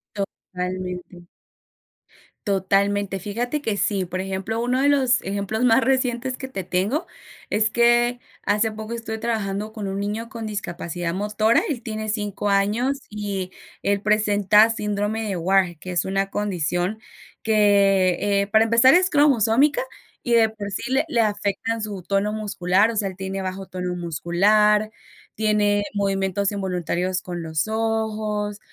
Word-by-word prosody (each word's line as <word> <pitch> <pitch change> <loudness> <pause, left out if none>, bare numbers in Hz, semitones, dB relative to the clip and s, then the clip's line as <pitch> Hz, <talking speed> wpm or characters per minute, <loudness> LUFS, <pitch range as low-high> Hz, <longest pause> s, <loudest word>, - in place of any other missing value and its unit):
Totalmente 180 -2 -6 1.2
totalmente, 195 0 +1
fíjate 240 +9 -3
que 220 -7 -1
sí, 195 -1 0
por 185 +2 -4
ejemplo, 195 +4 -3
uno 250 +2 +1
de 280 - +3
los 265 -4 +3
ejemplos 200 +4 -2
más 245 +2 +5
recientes 255 -1 0
que 265 - -6
te 195 -8 -5
tengo 205 - -1 0.4
es 215 +1 +3
que 240 +1 +3 0.2
hace 210 +2 +1
poco 220 +1 -7
estuve 225 -1 -5
trabajando 215 -2 -3
con 215 -3 -5
un 195 +1 -3
niño 215 +3 -3
con 230 -3 -6
discapacidad 175 -4 -4
motora, 210 +3 +2
él 265 -6 -3
tiene 215 -1 -4
5 205 -1 -2
años 220 +8 +1
y 200 -3 -4 0.3
él 200 0 +1
presenta 210 0 +4
síndrome 210 0 -2
de 195 - -2
Wahr, 180 -1 +1
que 180 +3 -7
es 175 - +1
una 195 +1 -1
condición 185 0 -1 0.4
que, 200 -4 +3 0.3
eh, 200 - -6
para 220 +1 +4
empezar 230 +3 +6
es 365 +2 +4
cromosómica 285 - +3 0.4
y 240 - 0
de 225 -1 +5
por 210 -2 -7
sí, 195 - -3
le 270 +3 +3
le 240 -6 0
afectan 210 +1 -1
su 205 -3 -5
tono 200 +3 0
muscular, 205 0 +1
o - - -6
sea, 205 -2 0
él 190 - -10
tiene 190 0 -4
bajo 190 +1 -5
tono 180 -1 -4
muscular, 205 +6 +2 0.5
tiene 210 -1 +2
movimientos 195 -1 0
involuntarios 185 -1 -2
con 175 -1 -6
los 160 +3 -1
ojos, 220 -2 -2
205 Hz, 150 wpm, -23 LUFS, 190-225 Hz, 1.2 s, empezar